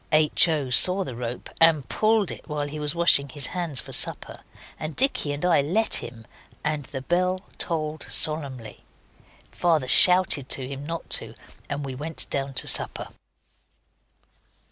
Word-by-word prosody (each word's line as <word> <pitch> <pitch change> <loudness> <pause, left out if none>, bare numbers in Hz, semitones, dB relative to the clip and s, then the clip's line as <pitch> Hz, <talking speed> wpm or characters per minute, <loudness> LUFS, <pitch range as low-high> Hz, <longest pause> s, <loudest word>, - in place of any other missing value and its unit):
H. 155 +2 +3
O. 150 -6 -2
saw 185 +9 +5
the 130 -9 -8
rope 120 0 -6
and 160 -4 +5
pulled 215 -4 +1
it - - -10
while 150 -1 -3
he 150 +1 -7
was 150 +1 -1
washing 155 -5 +3
his 140 +1 0
hands 170 -7 -3
for - - -4
supper, - - +1 0.4
and 155 0 -6
Dicky 260 - +4
and 145 +4 -4
I 170 -5 +3
let 190 +11 -1
him, 115 -2 -9 0.4
and 150 -2 -2
the 135 -2 -7
bell 180 +4 0 0.2
tolled 155 -2 -3
solemnly. 140 -7 -2 0.7
Father 160 -7 0
shouted 180 -3 +4
to 130 -2 -2
him 140 +1 -8
not 165 0 -6
to, - - -11 0.3
and 145 0 -4
we 135 - -6
went 155 +5 -4
down 135 -1 -3
to - - 0
supper. - - +1
150 Hz, 160 wpm, -24 LUFS, 140-170 Hz, 0.7 s, saw